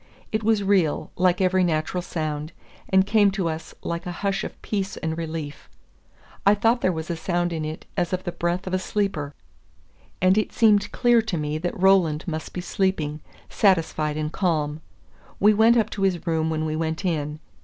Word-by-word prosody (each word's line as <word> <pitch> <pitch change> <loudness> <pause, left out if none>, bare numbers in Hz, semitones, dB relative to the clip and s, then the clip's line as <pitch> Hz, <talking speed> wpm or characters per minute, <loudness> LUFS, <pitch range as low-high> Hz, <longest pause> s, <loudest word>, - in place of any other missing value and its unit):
It 215 0 -1
was 215 -1 +2
real, 190 -6 +1
like 180 0 +2
every 185 0 +3
natural 165 +1 0
sound, 155 -2 -4 0.4
and 190 0 +4
came 205 0 +4
to 190 -3 -1
us 160 0 -5
like 170 +1 -4
a - - -3
hush 195 0 0
of - - -7
peace 195 -2 -2
and 160 -1 -3
relief. 160 -3 -6 0.7
I 200 +1 +5
thought 230 +4 +2
there 185 - +2
was 160 0 -4
a - - -1
sound 175 +1 -1
in 160 -1 -3
it 155 +1 -6
as 175 -3 0
of 185 0 -2
the 175 - -3
breath 175 +2 -2
of 185 - -5
a 185 - +2
sleeper, 185 -8 -2 0.8
and 185 +3 +4
it 215 - -2
seemed 210 -3 +4
clear 240 -2 +4
to 220 -6 -3
me 150 0 -2
that 175 +2 -3
Roland 180 -5 +3
must 160 -2 -4
be 180 - -5
sleeping, 175 -6 -1 0.3
satisfied 160 -6 +1
and 155 0 -2
calm. 155 -5 0 0.6
We 210 +2 +6
went 225 +3 +5
up 220 -2 +1
to 200 - -5
his 190 -3 0
room 160 -1 0
when 155 0 -1
we 155 0 -2
went 160 +3 -2
in. 150 -3 -2
175 Hz, 195 wpm, -24 LUFS, 160-195 Hz, 0.8 s, We